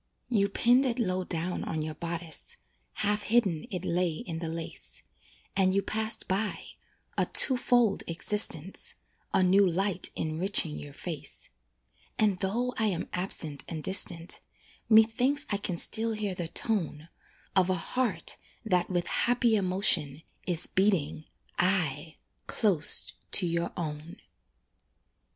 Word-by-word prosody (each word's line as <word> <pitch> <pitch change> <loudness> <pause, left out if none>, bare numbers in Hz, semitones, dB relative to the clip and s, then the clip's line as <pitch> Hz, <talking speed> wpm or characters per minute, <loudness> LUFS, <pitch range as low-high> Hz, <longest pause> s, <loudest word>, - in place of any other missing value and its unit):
You 200 -5 +1
pinned 245 +6 +3
it 235 - -2
low 185 -6 -1
down 175 0 -4
on 160 -1 -3
your 155 0 -5
bodice, 170 0 -5 0.4
Half 210 0 -1
hidden 205 -8 +1
it 180 -1 -5
lay 175 -1 0
in 165 0 -6
the 165 -1 -4
lace, 165 0 -7 0.5
And 190 -1 +2
you 200 - +1
passed 220 +2 -2
by 200 +3 -3 0.5
"a - - +2
two 260 - +5
fold 245 -4 +2
existence," 170 0 -1 0.4
A 190 - +2
new 190 +2 +4
light 190 +1 -1
enriching 155 - +1
your 75 -1 -10
face. - - -6 0.7
And 205 -4 +1
though 235 +6 -1
I 220 - +2
am 185 -5 -2
absent 165 -5 -3
and 160 -2 -6
distant, 180 -3 +2 0.5
Methinks 235 +6 +3
I 200 - +1
can 185 -3 -4
still 225 +5 +3
hear 210 -3 -3
the 175 -2 -4
tone 165 -6 -1 0.5
Of 190 -1 +3
a 185 - +2
heart 250 +8 -1 0.3
that, 180 -4 0
with 175 -2 -1
happy 240 -1 +2
emotion, 180 -7 +4 0.2
Is 175 -2 +1
beating, 185 -6 0 0.3
aye! 165 -5 0 0.3
close 190 -9 +4 0.2
to 185 - +6
your 170 0 -2
own. 155 +1 -6
185 Hz, 135 wpm, -28 LUFS, 165-210 Hz, 0.7 s, to